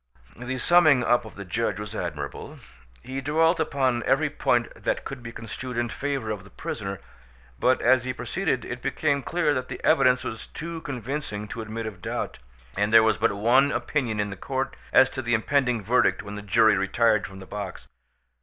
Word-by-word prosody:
The 125 +2 -4
summing 155 -2 +5
up 120 -1 +2
of 110 - -11
the 100 - -7
judge 105 +5 -1
was 105 0 -6
admirable. - - -5 0.5
He 130 +2 -5
dwelt 160 +4 +2
upon 135 -6 +1
every - - +2
point - - +1
that - - -2
could 135 -2 -6
be 115 -1 -7
construed 120 +2 -6
in 120 0 0
favour 135 -4 -3
of 105 -3 -5
the 100 - -15
prisoner, 100 -3 -5 0.6
but 130 - +3
as 130 0 +5
he 130 - -2
proceeded 125 +3 -2
it 120 0 -6
became 140 0 0
clear 165 0 +1
that 130 -2 -2
the - - -6
evidence 125 0 +4
was 110 - -6
too 165 0 -6
convincing 125 -5 -4
to 115 - -5
admit 110 +1 -5
of 100 -5 -7
doubt, - - -4 0.4
and 105 +2 +1
there 115 0 +8
was 110 - +2
but 115 -1 +2
one 130 +7 +4
opinion 120 -2 -1
in 105 0 -1
the - - -5
court 135 +6 -3 0.2
as 130 - +7
to 130 - -4
the 120 -1 +1
impending 125 -1 +1
verdict 120 +5 +2
when 105 0 -8
the 105 - -6
jury 105 +2 +4
retired 105 +3 +2
from 95 - -12
the 95 - -10
box. 100 -2 -7
120 Hz, 195 wpm, -25 LUFS, 110-135 Hz, 0.6 s, there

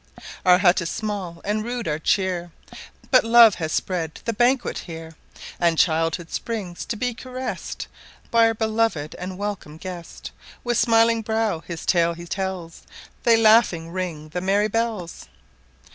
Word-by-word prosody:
Our 180 -1 +6
hut 185 -1 +4
is 170 - -3
small 195 -6 -4
and 210 +1 -1
rude 240 -1 -4
our 150 0 -1
cheer, 175 0 0 0.6
But 255 - +6
love 230 -1 +7
has 160 -1 -2
spread 165 -3 -2
the 230 - -1
banquet 245 +4 +1
here; 165 -1 -9 0.4
And 170 -2 +2
childhood 165 +1 +1
springs 205 -7 -4
to 240 - -3
be 245 +3 -2
caress'd 255 +2 -6 0.5
By 230 -1 +5
our 225 - 0
beloved 220 -9 0
and 185 +1 -6
welcome 200 -7 -5
guest; 175 0 -8 0.3
With 240 -1 0
smiling 230 0 +4
brow 220 -5 -1
his 165 0 -8
tale 170 -1 +3
he 170 +1 -9
tells, 185 -2 -4 0.4
They 230 -1 +6
laughing 215 -7 +4
ring 170 -4 -4
the 180 +3 -4
merry 200 +3 +2
bells. 220 -6 -3
190 Hz, 150 wpm, -23 LUFS, 170-225 Hz, 0.6 s, love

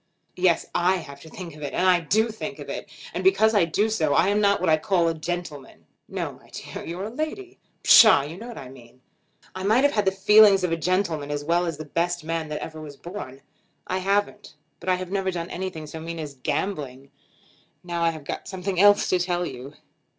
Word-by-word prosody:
"Yes; 180 -2 +2
I 180 +2 +2
have 140 -6 -8
to 160 - -12
think 170 -2 -9
of 155 - -13
it, 145 -2 -5
and 180 -3 +2
do 220 +3 +3
think 220 - -6
of - - -9
it; - - -6 0.2
and - - -3
because 220 - +4
I 200 -5 +4
do 200 +6 +1
so 155 -10 0
I 185 - +4
am 205 +1 +2
not 200 -1 +3
what 185 - -1
I 155 -1 +5
call 175 0 +1
a 165 - +1
gentleman." 160 -4 -6 0.2
"No; - - -4
my - - -20
dear; - - -8
you're 175 +3 -5
a 215 - -5
lady." 360 - -5 0.2
"Psha! 215 -11 +8
you 160 - -8
know 225 +6 -9
what 240 - -9
I 130 - -8
mean. 125 -1 -16 0.5
I 185 - -6
might 220 +7 +3
have 285 - +3
had 210 -2 +1
the 190 - +3
feelings 200 0 +6
of 180 - 0
a - - +2
gentleman 165 -4 -1
as 145 0 -3
well 175 +2 +1
as 165 -3 -3
the 155 - -7
best 170 +2 -1
man 165 -1 -3
that 150 - -4
ever 155 -1 -8
was 145 -2 -10
born. 155 -7 -9 0.4
I 185 - -2
haven't; 200 +2 -1 0.2
but - - -5
I 185 - +4
have 180 0 -6
never 195 -1 0
done 175 -1 -4
anything 180 -4 -5
so 155 +2 -8
mean 165 +1 -6
as 150 -3 -6
gambling. 140 -4 -3 0.7
Now 175 -1 -4
I 170 - +3
have 160 -2 -7
got - - -6
something 190 -1 -3
else 205 +1 +6
to 185 - +2
tell 175 0 -1
you." 135 0 -8
175 Hz, 230 wpm, -24 LUFS, 155-195 Hz, 0.7 s, Psha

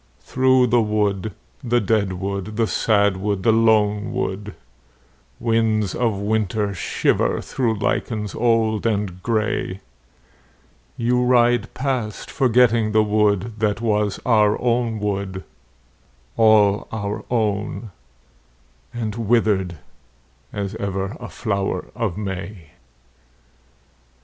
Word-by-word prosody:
Through 130 0 +3
the 120 0 +3
wood, 105 -1 0 0.3
the 120 0 +2
dead 100 -3 +1
wood, 100 +3 -4
the 115 - +3
sad 100 -3 +2
wood, 100 0 -2
the 115 - +4
lone 110 -2 +2
wood, 100 +1 -4 0.8
Winds 110 -3 +1
of 115 -5 0
winter 105 0 -1
shiver 95 - 0
through 115 -4 -1
lichens 105 0 -2
old 115 -2 +1
and 100 -4 -2
grey, 105 -3 -1 1.2
You 125 +1 +1
ride 120 -2 +3
past 130 -6 -3
forgetting 120 -4 +3
the 110 0 +4
wood 105 0 +1
that 105 -1 0
was 105 -3 0
our 105 -3 +3
own 120 -2 0
wood, 100 -2 -3 0.9
All 105 -3 +4
our 105 -1 -4
own 110 -1 -1 1.0
and 115 -3 -4
withered 105 -6 +1 0.7
as 100 -1 -4
ever 95 +2 -3
a - - -8
flower 100 -4 -2
of 110 -6 -2
May. 95 -4 -6
105 Hz, 105 wpm, -21 LUFS, 100-115 Hz, 1.2 s, the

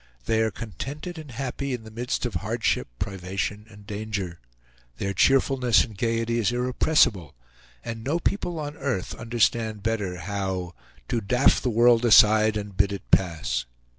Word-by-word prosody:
They 110 +7 +2
are 110 - +2
contented 140 - -7
and 155 -2 -10
happy 135 +1 -3
in 115 - -10
the 110 - -11
midst 120 +3 -3
of 120 - -2
hardship, 110 +6 -1
privation, 100 - -4
and 105 -1 -15
danger. 105 -4 -4 0.6
Their 100 0 -2
cheerfulness 130 +2 +4
and 110 -4 -9
gayety 115 +2 0
is 115 0 +1
irrepressible, 125 - +2 0.5
and 115 -1 -5
no 145 +7 0
people 175 -1 -2
on 145 -1 -5
earth 130 - -2
understand 115 -2 0
better 105 -5 -1
how 95 -1 -3 0.4
"to 120 -2 0
daff 125 +5 +3
the 125 - 0
world 120 +1 +4
aside 110 -1 +6
and 100 -2 -6
bid 100 +1 +2
it 100 - -7
pass." 85 -8 +1
110 Hz, 155 wpm, -25 LUFS, 100-125 Hz, 0.6 s, aside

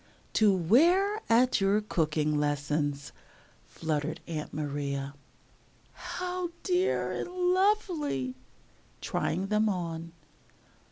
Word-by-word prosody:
"To 215 -2 +5
wear 340 - +3
at 240 0 +4
your 195 +2 +3
cooking 155 -7 0
lessons," 145 -1 -1 0.6
fluttered 155 0 -3
Aunt 155 -3 -5
Maria. 140 -2 -3 0.8
"How 360 -1 -4
dear 365 +1 +1
and - - -4
lovely!" 360 - +1 0.7
(Trying 190 +3 -2
them 215 +1 +2
on.) 170 -3 -4
185 Hz, 90 wpm, -29 LUFS, -, 0.8 s, To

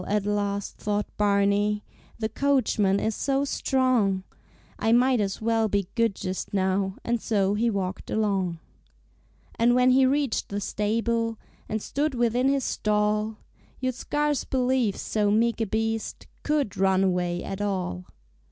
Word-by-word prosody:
at 205 -1 0
last 205 -1 -2
thought 205 0 -1
Barney, 205 0 +2 0.3
"The 220 - -1
coachman 220 -6 +1
is 220 - 0
so 275 +4 0
strong, 255 -9 +1 0.6
I 225 - +1
might 250 0 +4
as 195 +1 -3
well 225 -1 +2
be 200 -2 -1
good 230 -4 +1
just 185 +1 -4
now," 190 0 0
And 235 -1 -1
so 200 -3 +1
he 230 +3 +1
walked 190 -3 -3
along. 195 -5 0 1.0
And 240 +1 +4
when 250 0 +5
he 260 +1 +5
reached 275 -2 0
the 200 - -2
stable 230 +3 -1 0.3
And 215 -1 -2
stood 290 0 -1
within 240 +2 +2
his 275 -1 +1
stall 210 0 0 0.4
You'd 255 0 -1
scarce 295 +3 -1
believe 255 -5 +1
so 210 -2 0
meek 230 +2 +2
a 225 - 0
beast 225 +1 -2 0.2
Could 295 -8 -1
run 190 0 +3
away 180 -2 0
at 195 +1 -5
all! 185 - -2
215 Hz, 145 wpm, -26 LUFS, 200-240 Hz, 1.0 s, when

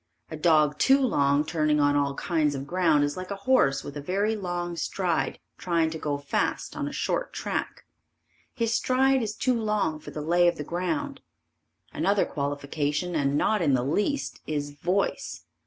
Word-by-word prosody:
A - - -4
dog 155 -2 +3
too 270 +1 +5
long 145 - +2
turning 155 -2 +1
on 145 0 +3
all 140 -1 +1
kinds 155 -3 0
of 135 0 -5
ground 165 -3 +2
is 145 0 -1
like 185 0 -6
a 200 - -3
horse 140 - +3
with 145 - -8
a 145 - -5
very 200 +8 0
long 175 -3 -3
stride 170 0 -1 0.2
trying 165 -2 +1
to 160 - -5
go 145 -2 -1
fast 140 0 -2
on - - -2
a - - -4
short - - -2
track. - - -4 0.7
His 230 -1 0
stride 260 +3 +2
is 215 -2 -3
too 255 - +1
long 210 -8 0
for - - -10
the 150 - -6
lay 175 +2 +3
of 175 - +1
the 150 - -4
ground. 275 - -3 0.7
Another 200 0 +2
qualification 145 +3 -2
and 140 -2 +1
not 215 +6 +2
in 140 -5 +3
the 125 0 0
least, 210 - -1
is 145 -1 -2
voice. 180 +7 -2
165 Hz, 180 wpm, -26 LUFS, 145-200 Hz, 0.7 s, too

